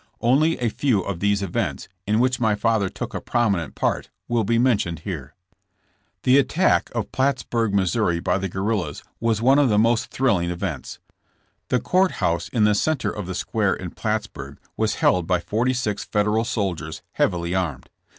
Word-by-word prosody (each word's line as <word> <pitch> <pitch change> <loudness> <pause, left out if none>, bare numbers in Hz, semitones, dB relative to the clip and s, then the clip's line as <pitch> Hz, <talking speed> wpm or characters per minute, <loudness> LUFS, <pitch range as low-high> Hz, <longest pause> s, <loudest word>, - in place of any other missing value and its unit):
Only 145 +7 +3
a 120 -2 0
few 115 -3 +1
of 95 -2 -4
these 100 0 +1
events, 95 - -2 0.2
in 105 +2 +2
which 125 0 +2
my 110 -3 +2
father 105 -2 +1
took - - -6
a - - -4
prominent 100 - 0
part - - -1 0.2
will 120 -1 +1
be 115 +3 +1
mentioned 105 -10 +1
here. 80 -7 -6 0.9
The 130 +2 +5
attack 155 +7 +2
of 115 -4 -2
Plattsburg, 125 -5 0
Mo., 95 -2 +1
by 95 - +1
the 95 0 -3
guerrillas 95 -4 -2 0.2
was 115 -1 0
one 135 +3 +5
of 140 -3 +4
these 105 - +3
most 115 +1 +3
thrilling 100 -10 +1
events. 90 -1 -4 0.7
The 125 - +1
court 185 +6 +2
house 85 - -1
in 115 -4 +1
the 105 0 +4
center 155 +8 0
of 105 -4 -6
the 95 - -4
square 105 -1 0
in 90 -2 -7
Plattsburg 105 - -4 0.2
was - - 0
held 90 -2 +2
by 90 -2 +2
forty 115 +8 0
six 110 -5 -2
Federal 105 +2 +1
soldiers 95 -8 -3
heavily 85 -2 0
armed. 80 -9 -2
105 Hz, 175 wpm, -23 LUFS, 95-120 Hz, 0.9 s, The